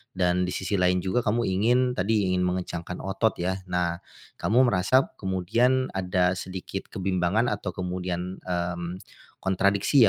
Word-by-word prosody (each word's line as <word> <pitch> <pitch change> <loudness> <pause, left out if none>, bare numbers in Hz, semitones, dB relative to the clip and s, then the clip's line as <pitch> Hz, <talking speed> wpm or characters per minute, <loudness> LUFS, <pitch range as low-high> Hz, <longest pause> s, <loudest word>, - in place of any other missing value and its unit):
Dan 90 0 +2
di 90 - -3
sisi 95 +1 -1
lain 90 0 +2
juga 95 +6 +1
kamu 115 +3 +2
ingin, 110 +6 +2
tadi 100 -3 +1
ingin 90 - +1
mengencangkan 90 -1 -4
otot 95 +3 0
ya? 95 +2 -2
Nah, 90 -1 -1 0.4
kamu 120 +5 +4
merasa 130 +9 +3
kemudian 115 +8 +1
ada 90 -1 +1
sedikit 95 +1 -6
kebimbangan 95 +4 0
atau 100 -3 -4
kemudian, 90 0 -3
mmm, 85 0 -3 0.4
kontradiksi 100 +7 +3
95 Hz, 135 wpm, -26 LUFS, 90-100 Hz, 0.4 s, kamu